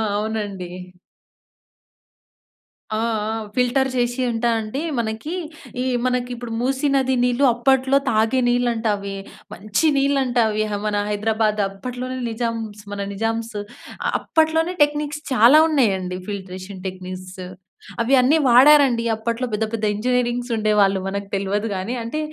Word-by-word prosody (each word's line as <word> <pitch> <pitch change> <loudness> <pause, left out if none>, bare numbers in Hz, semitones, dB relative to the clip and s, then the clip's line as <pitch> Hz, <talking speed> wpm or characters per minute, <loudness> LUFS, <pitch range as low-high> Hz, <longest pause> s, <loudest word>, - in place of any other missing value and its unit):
అవునండి. 205 -4 -3 2.2
ఆ! 215 - 0 0.3
ఆ! 220 - -2 0.2
ఫిల్టర్ 255 +2 +2
చేసి 245 +1 0
అంటే 235 0 0
అండి 220 +7 -4 0.2
మనకి, 225 +8 -3 0.5
ఈ - - -2 0.2
మనకి 250 -1 0
ఇప్పుడు 240 -1 -7
మూసి 265 +3 0
నది 265 -1 +2
నీళ్లు, 250 +2 +1
అప్పట్లో 265 +2 +3
తాగే 225 +4 +2
నీళ్ళు 245 0 +2
అంట 225 0 -3
అవి. 200 0 -6 0.4
మంచి 210 +9 -1
నీళ్ళంట 275 -3 +1
అవి. 215 0 0
ఆ! - - -1
మన 210 - -1
హైదరాబాద్ 215 0 0
అప్పట్లోనే 250 +6 -6
నిజామ్స్, 225 -2 -4
మన 200 - -4
నిజామ్స్ 225 +1 -2 0.5
అ - - +2
అప్పట్లోనే 320 +2 +1
టెక్నిక్స్ 295 0 -2
చాలా 250 +6 +7
ఉన్నాయండి, 190 - +1
ఫిల్ట్రేషన్ 190 -1 -7
టెక్నిక్స్. 185 0 -8 0.6
అవి 235 +4 +1
అన్నీ 270 +6 +4
వాడారండి, 255 -1 +6
అప్పట్లో 230 +3 -2
పెద్ద, 220 +1 0
పెద్ద 220 -1 -2
ఇంజనీరింగ్స్ 245 +2 -1
ఉండేవాళ్ళు, 210 -3 +2
మనకు 200 +1 -4
తెలవదు 200 +2 -1
గానీ. 190 +6 -3
అంటే, 230 +7 -4
230 Hz, 130 wpm, -21 LUFS, 210-255 Hz, 2.2 s, చాలా